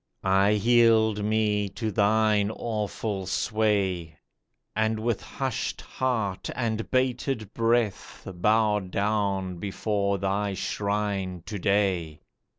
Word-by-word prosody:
I 95 Hz, +1 st, +4 dB
yield 110 Hz, -1 st, +4 dB
me 105 Hz, -1 st, +1 dB
to 110 Hz, +3 st, -3 dB
thine 105 Hz, 0 st, +3 dB
awful 105 Hz, -3 st, -3 dB
sway, 95 Hz, -7 st, 0 dB, 0.6 s
And 110 Hz, 0 st, +1 dB
with 115 Hz, -1 st, -1 dB
hushed 130 Hz, -3 st, -3 dB
heart 110 Hz, -8 st, -2 dB
and 115 Hz, -3 st, -2 dB
bated 130 Hz, -4 st, -1 dB
breath 115 Hz, -2 st, 0 dB
Bow 105 Hz, +3 st, +2 dB
down 100 Hz, -1 st, -1 dB
before 100 Hz, 0 st, -1 dB
thy 100 Hz, +1 st, -1 dB
shrine 100 Hz, -4 st, -2 dB
to 105 Hz, -2 st, -5 dB
day 90 Hz, -6 st, 0 dB
105 Hz, 100 wpm, -26 LUFS, 100-110 Hz, 0.6 s, I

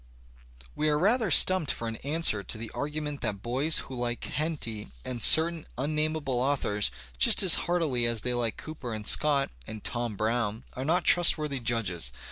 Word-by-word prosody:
We 155 Hz, -, -1 dB
are 150 Hz, -, +1 dB
rather 215 Hz, +5 st, +1 dB
stumped 185 Hz, -2 st, +5 dB
for 115 Hz, -, -2 dB
an 110 Hz, 0 st, -5 dB
answer 145 Hz, -7 st, 0 dB
to 105 Hz, -, -5 dB
the 115 Hz, 0 st, -8 dB
argument 150 Hz, 0 st, -5 dB
that 100 Hz, -1 st, -4 dB
boys 135 Hz, +7 st, +2 dB
who -, -, -11 dB
like 120 Hz, -1 st, -4 dB
Henty 140 Hz, -8 st, -3 dB, 0.2 s
and 125 Hz, -2 st, -6 dB
certain 160 Hz, +3 st, +5 dB
unnamable 150 Hz, -1 st, -2 dB
authors 125 Hz, -6 st, -2 dB, 0.3 s
just 65 Hz, -, +6 dB
as 185 Hz, -, +7 dB, 0.2 s
heartily 150 Hz, -9 st, 0 dB
as 115 Hz, -2 st, -2 dB
they 125 Hz, +2 st, -2 dB
like 120 Hz, -2 st, -2 dB
Cooper 135 Hz, -7 st, -8 dB
and 105 Hz, -1 st, -8 dB
Scott 145 Hz, +1 st, +2 dB, 0.2 s
and 110 Hz, -1 st, -9 dB
"Tom 120 Hz, -3 st, -3 dB
Brown" 110 Hz, +1 st, -3 dB
are 130 Hz, -, -6 dB
not 170 Hz, +4 st, +1 dB
trustworthy 155 Hz, -5 st, +3 dB
judges. 100 Hz, -, -1 dB
130 Hz, 170 wpm, -26 LUFS, 115-155 Hz, 0.3 s, as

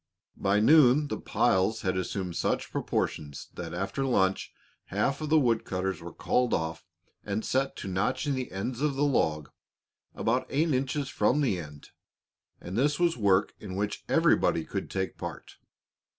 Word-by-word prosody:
By 100 Hz, +1 st, +2 dB
noon 145 Hz, +3 st, +5 dB
the -, -, -3 dB
piles 110 Hz, -1 st, +1 dB
had 95 Hz, -1 st, 0 dB
assumed 95 Hz, -1 st, -3 dB
such -, -, -1 dB
proportions 75 Hz, -1 st, -3 dB
that 85 Hz, -2 st, -6 dB
after 95 Hz, +10 st, -2 dB
luncheon 95 Hz, -8 st, +1 dB, 0.3 s
half 135 Hz, +9 st, -1 dB
of 155 Hz, -, -3 dB
the 160 Hz, -, +5 dB
wood 120 Hz, -6 st, +2 dB
cutters 95 Hz, -1 st, -3 dB
were -, -, -8 dB
called 125 Hz, -1 st, +1 dB
off 80 Hz, 0 st, -3 dB, 0.4 s
and 105 Hz, +2 st, -3 dB
set 135 Hz, +1 st, 0 dB
to -, -, -7 dB
notching 110 Hz, +10 st, 0 dB
the 130 Hz, -1 st, -3 dB
ends 115 Hz, +7 st, -4 dB
of 150 Hz, -2 st, +1 dB
the 140 Hz, -, +1 dB
log, 75 Hz, -, 0 dB, 0.6 s
about 125 Hz, +3 st, 0 dB
eight 155 Hz, +2 st, +1 dB
inches 135 Hz, +2 st, -1 dB
from 150 Hz, -, +2 dB
the 110 Hz, -10 st, +1 dB
end, 75 Hz, -3 st, -10 dB, 0.7 s
and 90 Hz, -, -7 dB
this 145 Hz, +6 st, +2 dB
was 175 Hz, -1 st, +3 dB
work 100 Hz, -3 st, +2 dB
in 95 Hz, -3 st, -7 dB
which 105 Hz, +1 st, -2 dB
everybody -, -, +3 dB
could -, -, -4 dB
take 95 Hz, -1 st, -3 dB
part. -, -, -7 dB
110 Hz, 165 wpm, -28 LUFS, 95-135 Hz, 0.7 s, noon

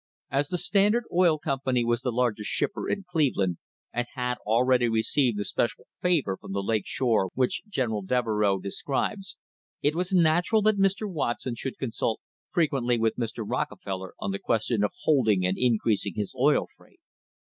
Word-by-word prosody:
As 140 Hz, +2 st, +1 dB
the 180 Hz, -, -2 dB
Standard 205 Hz, +6 st, +3 dB
Oil 175 Hz, -3 st, +4 dB
Company 130 Hz, -4 st, 0 dB
was 120 Hz, 0 st, +1 dB
the 125 Hz, -, -1 dB
largest 115 Hz, -3 st, 0 dB
shipper -, -, -2 dB
in 200 Hz, -, -1 dB
Cleveland 130 Hz, -, +1 dB, 0.3 s
and 120 Hz, 0 st, -1 dB
had 125 Hz, -1 st, -2 dB
already 120 Hz, +2 st, +3 dB
received 115 Hz, +1 st, +1 dB
the 105 Hz, -, -2 dB
special 120 Hz, -, -1 dB, 0.2 s
favour 155 Hz, -, +1 dB
from -, -, -9 dB
the 100 Hz, 0 st, -1 dB
Lake 110 Hz, -1 st, 0 dB
Shore 115 Hz, -7 st, +1 dB
which 130 Hz, -1 st, +1 dB
General 120 Hz, -, -1 dB
Devereux 105 Hz, -2 st, +1 dB
describes, 150 Hz, -, -3 dB, 0.5 s
it 145 Hz, -, +3 dB
was 180 Hz, +3 st, -2 dB
natural 175 Hz, +5 st, +3 dB
that 215 Hz, -1 st, +3 dB
Mr. 195 Hz, +2 st, +2 dB
Watson 130 Hz, -8 st, -2 dB
should 130 Hz, +3 st, -5 dB
consult 115 Hz, -3 st, -2 dB, 0.3 s
frequently 135 Hz, -7 st, +1 dB
with 115 Hz, -1 st, +1 dB
Mr. 115 Hz, -1 st, -3 dB
Rockefeller 95 Hz, -1 st, -4 dB
on 100 Hz, -, -2 dB
the 100 Hz, -, -3 dB
ques 110 Hz, -2 st, 0 dB
tion 115 Hz, -4 st, 0 dB
of 105 Hz, -, +2 dB
holding 110 Hz, -11 st, +3 dB
and 90 Hz, +1 st, +1 dB
increasing 110 Hz, -4 st, +1 dB
his 105 Hz, -2 st, -2 dB
oil 140 Hz, +4 st, +3 dB
freight. 375 Hz, -, -23 dB
125 Hz, 170 wpm, -27 LUFS, 110-155 Hz, 0.5 s, Oil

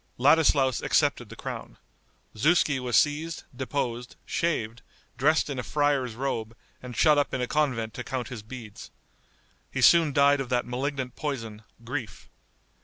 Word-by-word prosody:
Ladislaus 140 Hz, -2 st, +4 dB
accepted -, -, +1 dB
the -, -, -10 dB
crown. -, -, -7 dB, 0.6 s
Zuski 150 Hz, +3 st, +3 dB
was 125 Hz, -2 st, +1 dB
seized, 155 Hz, +3 st, +1 dB
deposed, 125 Hz, -2 st, -3 dB
shaved, 125 Hz, -8 st, -2 dB, 0.3 s
dressed 150 Hz, +5 st, +2 dB
in 140 Hz, -3 st, -4 dB
a -, -, -3 dB
friar's 140 Hz, -5 st, 0 dB
robe 115 Hz, -3 st, -3 dB, 0.2 s
and 125 Hz, -2 st, -8 dB
shut 150 Hz, -2 st, +5 dB
up 145 Hz, -, -1 dB
in 130 Hz, -, -2 dB
a -, -, +1 dB
convent 125 Hz, -6 st, -1 dB
to 125 Hz, -, -6 dB
count 125 Hz, -2 st, -4 dB
his 125 Hz, -4 st, -7 dB
beads. 110 Hz, -2 st, -10 dB, 0.8 s
He -, -, -3 dB
soon 165 Hz, -3 st, +6 dB
died 140 Hz, 0 st, +4 dB
of 130 Hz, -, -5 dB
that 125 Hz, -1 st, +1 dB
malignant 130 Hz, 0 st, -3 dB
poison, 115 Hz, -8 st, -5 dB, 0.2 s
grief. 120 Hz, -2 st, -6 dB
130 Hz, 150 wpm, -27 LUFS, 120-145 Hz, 0.8 s, soon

